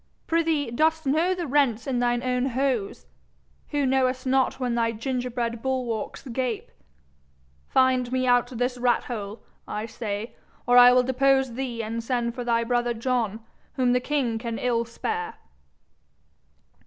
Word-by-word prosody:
Prithee, 325 Hz, -6 st, +1 dB
dost 315 Hz, +5 st, +1 dB
know 320 Hz, +7 st, +2 dB
the 350 Hz, -2 st, -3 dB
rents 260 Hz, -6 st, +1 dB
in 255 Hz, -3 st, -1 dB
thine 240 Hz, 0 st, +1 dB
own 250 Hz, 0 st, 0 dB
hose, 255 Hz, -5 st, -1 dB, 0.6 s
who 290 Hz, -2 st, 0 dB
knowest 255 Hz, -1 st, +1 dB
not 265 Hz, 0 st, +1 dB
when 250 Hz, -2 st, -1 dB
thy 230 Hz, -1 st, +1 dB
gingerbread 240 Hz, -1 st, -3 dB
bulwarks 250 Hz, -4 st, -3 dB
gape? 245 Hz, -2 st, -3 dB, 1.0 s
Find 255 Hz, -2 st, +2 dB
me 255 Hz, 0 st, +1 dB
out 245 Hz, -1 st, +4 dB
this 245 Hz, 0 st, -2 dB
rat 245 Hz, 0 st, +2 dB
hole, 210 Hz, -3 st, -6 dB, 0.2 s
I 210 Hz, +1 st, -3 dB
say, 220 Hz, -1 st, -5 dB, 0.3 s
or 245 Hz, -, +3 dB
I 245 Hz, 0 st, +9 dB
will 250 Hz, 0 st, +5 dB
depose 265 Hz, 0 st, +2 dB
thee 240 Hz, -2 st, -3 dB
and 230 Hz, +1 st, -4 dB
send 235 Hz, -1 st, -1 dB
for 245 Hz, 0 st, -5 dB
thy 235 Hz, -1 st, +1 dB
brother 240 Hz, 0 st, 0 dB
John, 230 Hz, -3 st, -1 dB, 0.3 s
whom 250 Hz, -2 st, +2 dB
the 250 Hz, -, +3 dB
king 250 Hz, -4 st, -1 dB
can 230 Hz, -1 st, -4 dB
ill 235 Hz, -2 st, 0 dB
spare.' 440 Hz, -, -4 dB
250 Hz, 150 wpm, -25 LUFS, 235-265 Hz, 1.0 s, I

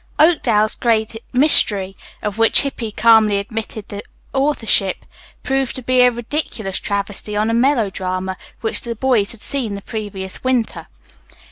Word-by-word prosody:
"Oakdale's 235 Hz, -10 st, +3 dB
Great 225 Hz, -2 st, 0 dB, 0.2 s
Mystery," 205 Hz, -8 st, +4 dB, 0.3 s
of 210 Hz, 0 st, -3 dB
which 225 Hz, -1 st, +5 dB
Hippy 250 Hz, -5 st, -4 dB
calmly 220 Hz, -2 st, +4 dB
admitted 215 Hz, +1 st, -5 dB
the 205 Hz, 0 st, -6 dB, 0.3 s
authorship, 260 Hz, -8 st, +1 dB, 0.4 s
proved 270 Hz, -1 st, -1 dB
to 260 Hz, -, -5 dB
be 255 Hz, +1 st, +3 dB
a 250 Hz, -, +7 dB
ridiculous 235 Hz, -4 st, -4 dB
travesty 205 Hz, +1 st, -3 dB
on 215 Hz, +2 st, +1 dB
a -, -, 0 dB
melodrama 190 Hz, -7 st, 0 dB, 0.3 s
which 225 Hz, -, 0 dB
the 235 Hz, -1 st, -5 dB
boys 230 Hz, -4 st, +1 dB
had 230 Hz, -, -12 dB
seen 245 Hz, -7 st, -2 dB
the 200 Hz, -, -7 dB
previous 200 Hz, -4 st, -6 dB
winter. 255 Hz, -3 st, -1 dB
225 Hz, 140 wpm, -19 LUFS, 205-250 Hz, 0.4 s, a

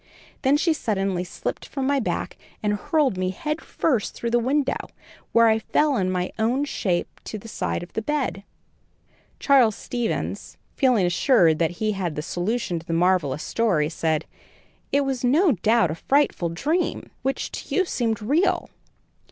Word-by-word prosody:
Then 275 Hz, +2 st, +4 dB
she 330 Hz, +2 st, +2 dB
suddenly 195 Hz, -, -1 dB
slipped 180 Hz, -, -5 dB
from 270 Hz, -2 st, -3 dB
my 280 Hz, +1 st, +2 dB
back 235 Hz, -, -2 dB, 0.3 s
and 210 Hz, 0 st, +1 dB
hurled 260 Hz, -, +1 dB
me 185 Hz, 0 st, 0 dB
head 300 Hz, -, -3 dB
first 255 Hz, -10 st, -1 dB
through 235 Hz, -, -3 dB
the 240 Hz, -, +4 dB
window, 270 Hz, +3 st, 0 dB, 0.4 s
where 230 Hz, 0 st, +5 dB
I 220 Hz, 0 st, +3 dB
fell 295 Hz, +5 st, +1 dB
in 185 Hz, -5 st, +1 dB
my 180 Hz, 0 st, -1 dB
own 245 Hz, +6 st, +1 dB
shape 185 Hz, -10 st, -1 dB, 0.2 s
by 215 Hz, -, -6 dB
the 210 Hz, -, -11 dB
side 215 Hz, -, -3 dB
of 175 Hz, -, -12 dB
the 220 Hz, -, -1 dB
bed." 275 Hz, -5 st, -1 dB, 1.0 s
Charles 255 Hz, -7 st, +4 dB
Stevens, 240 Hz, -2 st, -3 dB, 0.2 s
feeling 250 Hz, -, +3 dB
assured 175 Hz, -, +3 dB
that 165 Hz, -2 st, +2 dB
he 215 Hz, -1 st, 0 dB
had 180 Hz, -6 st, -3 dB
a 150 Hz, -, -2 dB
solution 180 Hz, +1 st, -2 dB
to 165 Hz, -, -15 dB
the 165 Hz, -, -2 dB
marvellous 165 Hz, -5 st, +2 dB
story, 180 Hz, -10 st, +1 dB
said: 160 Hz, -2 st, -1 dB, 0.7 s
"It 280 Hz, -, +3 dB
was 265 Hz, -2 st, -2 dB
no 305 Hz, +8 st, +4 dB
doubt 220 Hz, -, +2 dB
a -, -, -3 dB
frightful 275 Hz, -11 st, +2 dB
dream, 305 Hz, -, -1 dB
which 270 Hz, +1 st, -2 dB
to -, -, -5 dB
you 380 Hz, -, +3 dB
seemed 225 Hz, -, -1 dB
real." 345 Hz, -, +1 dB
225 Hz, 170 wpm, -24 LUFS, 180-275 Hz, 1.0 s, where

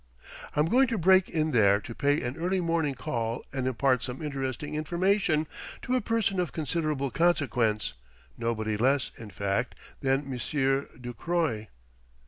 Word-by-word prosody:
"I'm 150 Hz, -, +3 dB
going 255 Hz, +9 st, +4 dB
to 230 Hz, -2 st, -1 dB
break 185 Hz, +1 st, +5 dB
in 155 Hz, -1 st, 0 dB
there 100 Hz, -5 st, +5 dB
to 115 Hz, -, -8 dB
pay 145 Hz, +4 st, +1 dB
an 120 Hz, +2 st, -3 dB
early 180 Hz, +4 st, 0 dB
morning 165 Hz, -5 st, 0 dB
call 115 Hz, -1 st, -3 dB
and 130 Hz, -2 st, -1 dB
impart 130 Hz, 0 st, +2 dB
some 125 Hz, 0 st, -4 dB
interesting 140 Hz, -2 st, -3 dB
information 170 Hz, +1 st, +1 dB, 0.4 s
to 255 Hz, -, 0 dB
a 255 Hz, -, +2 dB
person 225 Hz, -4 st, 0 dB
of 175 Hz, -3 st, 0 dB
considerable 155 Hz, -3 st, -1 dB
consequence 125 Hz, -11 st, +1 dB, 0.4 s
nobody 110 Hz, -2 st, -1 dB
less, 135 Hz, +4 st, +2 dB
in 110 Hz, -2 st, -8 dB
fact, 100 Hz, +5 st, -1 dB, 0.2 s
than 135 Hz, +1 st, +1 dB
Monsieur 135 Hz, +1 st, 0 dB
Ducroy." 120 Hz, -2 st, -2 dB
140 Hz, 145 wpm, -28 LUFS, 120-170 Hz, 0.4 s, break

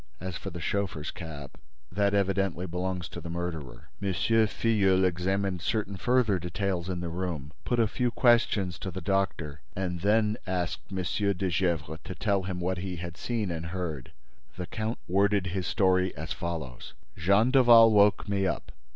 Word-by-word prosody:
As 95 Hz, 0 st, -5 dB
for 95 Hz, -, -5 dB
the 85 Hz, -1 st, -7 dB
chauffeur's 90 Hz, -4 st, -2 dB
cap, 75 Hz, -5 st, -9 dB, 0.3 s
that 100 Hz, +2 st, +1 dB
evidently 95 Hz, -2 st, 0 dB
belongs 90 Hz, 0 st, -3 dB
to 85 Hz, -, -8 dB
the 85 Hz, -, -7 dB
murderer." 85 Hz, -5 st, -5 dB
M. 100 Hz, -1 st, 0 dB
Filleul 105 Hz, -1 st, +3 dB
examined 95 Hz, +1 st, 0 dB
certain 105 Hz, 0 st, -1 dB
further 115 Hz, -2 st, +2 dB
details 90 Hz, +1 st, -2 dB
in 90 Hz, -1 st, -2 dB
the 85 Hz, -, -3 dB
room, 85 Hz, -5 st, -4 dB
put 120 Hz, -, 0 dB
a 115 Hz, -, +5 dB
few 120 Hz, +3 st, 0 dB
questions 115 Hz, -8 st, +2 dB
to 95 Hz, -, -4 dB
the 95 Hz, -, -5 dB
doctor 85 Hz, -6 st, -1 dB
and 90 Hz, -2 st, -2 dB
then 105 Hz, +3 st, +2 dB
asked 90 Hz, 0 st, -3 dB
M. 95 Hz, -1 st, -2 dB, 0.3 s
de 95 Hz, -1 st, -1 dB
Gesvres 80 Hz, -3 st, -1 dB
to 95 Hz, -, -6 dB
tell 100 Hz, +2 st, +1 dB
him 90 Hz, -1 st, -4 dB
what 90 Hz, +1 st, -1 dB
he 90 Hz, 0 st, -4 dB
had 85 Hz, 0 st, -6 dB
seen 110 Hz, -2 st, -2 dB
and 85 Hz, 0 st, -4 dB
heard. 85 Hz, -7 st, -4 dB, 0.5 s
The 90 Hz, -, -3 dB
count 110 Hz, +6 st, -3 dB
worded 100 Hz, +1 st, +2 dB
his 90 Hz, 0 st, -2 dB
story 95 Hz, -4 st, +2 dB
as 80 Hz, +1 st, -4 dB
follows: 80 Hz, -10 st, -6 dB, 0.2 s
"Jean 100 Hz, +8 st, +3 dB
Daval 120 Hz, -4 st, +8 dB
woke 105 Hz, -1 st, +4 dB
me 100 Hz, -1 st, +1 dB
up. 85 Hz, -, -3 dB
95 Hz, 170 wpm, -28 LUFS, 85-100 Hz, 0.5 s, Daval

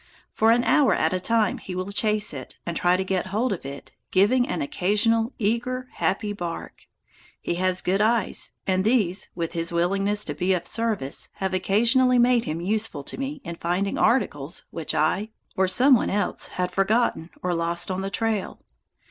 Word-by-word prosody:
For 220 Hz, -, +3 dB
an 240 Hz, +1 st, +4 dB
hour 290 Hz, 0 st, +4 dB
at 160 Hz, +3 st, +1 dB
a 185 Hz, -, 0 dB
time 220 Hz, +1 st, +1 dB
he 185 Hz, -, -7 dB
will 185 Hz, +2 st, -4 dB
chase 210 Hz, -1 st, +2 dB
it 130 Hz, -3 st, -8 dB
and 170 Hz, -, -4 dB
try 180 Hz, +1 st, +2 dB
to 190 Hz, -, -1 dB
get 190 Hz, -1 st, -2 dB
hold 215 Hz, +4 st, 0 dB
of 165 Hz, -7 st, -7 dB
it, 140 Hz, 0 st, -9 dB, 0.2 s
giving 240 Hz, +7 st, +3 dB
an 175 Hz, -, -2 dB
occasional 225 Hz, -, +1 dB
eager, 250 Hz, +4 st, -1 dB
happy 205 Hz, +2 st, -1 dB
bark. 175 Hz, -4 st, -7 dB, 0.5 s
He -, -, -3 dB
has 185 Hz, 0 st, +1 dB
good 195 Hz, +3 st, +1 dB
eyes, 225 Hz, +1 st, +1 dB
and 190 Hz, -1 st, +1 dB
these, 205 Hz, -5 st, +1 dB
with 165 Hz, -2 st, -3 dB
his 165 Hz, -1 st, -2 dB
willingness 195 Hz, +4 st, +1 dB
to 145 Hz, -, -3 dB
be 180 Hz, +6 st, 0 dB
of 180 Hz, -, -2 dB
service, 220 Hz, -12 st, -1 dB
have 190 Hz, -1 st, -3 dB
occasionally 235 Hz, +7 st, +3 dB
made 240 Hz, -1 st, +3 dB
him 160 Hz, +2 st, -3 dB
useful 210 Hz, -5 st, -2 dB
to -, -, -7 dB
me 275 Hz, +1 st, -4 dB
in 170 Hz, 0 st, -7 dB
finding 180 Hz, +4 st, -1 dB
articles 175 Hz, -, 0 dB
which 165 Hz, -, -3 dB
I, 190 Hz, +8 st, +1 dB, 0.3 s
or 190 Hz, 0 st, +2 dB
some 255 Hz, +10 st, +5 dB
one 240 Hz, -, +3 dB
else, 205 Hz, +1 st, -1 dB
had 180 Hz, 0 st, -3 dB
forgotten 195 Hz, -3 st, +1 dB
or 180 Hz, -1 st, 0 dB
lost 170 Hz, +2 st, 0 dB
on 185 Hz, +1 st, -2 dB
the 195 Hz, -, -3 dB
trail. 220 Hz, -1 st, -2 dB
195 Hz, 185 wpm, -24 LUFS, 180-225 Hz, 0.5 s, some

